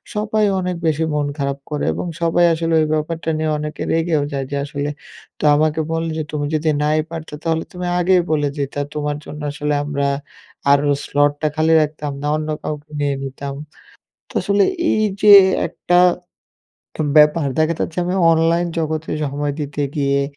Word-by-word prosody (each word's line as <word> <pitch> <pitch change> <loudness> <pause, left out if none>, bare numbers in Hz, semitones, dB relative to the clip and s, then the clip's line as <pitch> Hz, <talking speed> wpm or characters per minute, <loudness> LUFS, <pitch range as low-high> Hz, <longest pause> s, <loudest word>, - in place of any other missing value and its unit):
সবাই 215 0 +1
অনেক 180 -1 -2
বেশি 155 +1 +1
মন 145 -1 0
খারাপ 140 -1 -2
করে 150 -1 -2
এবং - - -4 0.2
সবাই 170 +1 +3
আসলে 165 0 -1
ওই 155 - +1
ব্যাপারটা 160 +2 -2
নিয়ে 155 0 -1
অনেকে 150 0 -5
রেগেও 160 -3 +1
যায়। 135 -1 -2
যে 140 - -1
আসলে 145 0 -3 0.5
তো - - -8
আমাকে 155 +1 +1
বলে 165 0 -1
যে, 155 - -1
"তুমি 145 -1 -2
যদি 155 +1 0
নাই 155 +1 +2
পারতে 160 -2 -7
তাহলে 160 -1 0
তুমি 180 0 -4
আগেই 180 +1 +4
বলে 145 -2 +1
দিতা। 140 0 -3
তোমার 150 -1 -2
জন্য 150 0 -8
আসলে 150 0 -2
আমরা 140 -1 -1 0.6
আরো 145 +1 +3 0.2
slot 145 0 +2
টা 155 - +2
খালি 160 +1 +2
রাখতাম 150 -1 -3
না, 145 - -2
অন্য 155 0 -4
কাউকে 150 0 -6
নিয়ে 145 -1 0
নিতাম।" 135 +1 -6 0.8
তো - - -15
আসলে, 200 0 +3 0.3
এই 215 - +2 0.2
যে 210 -1 +8 0.4
একটা 175 0 +1 1.0
উ - - +1 0.2
ব্যাপার, 150 0 +4
দেখা 155 +1 +2
যাচ্ছি 160 - -3
আমি 180 - -1 0.2
অনলাইন 165 +2 +2
জগতে 160 0 -2
সময় 145 +1 -2
দিতে 145 0 -3
গিয়ে, 140 -1 +1
155 Hz, 175 wpm, -19 LUFS, 145-165 Hz, 1.0 s, যে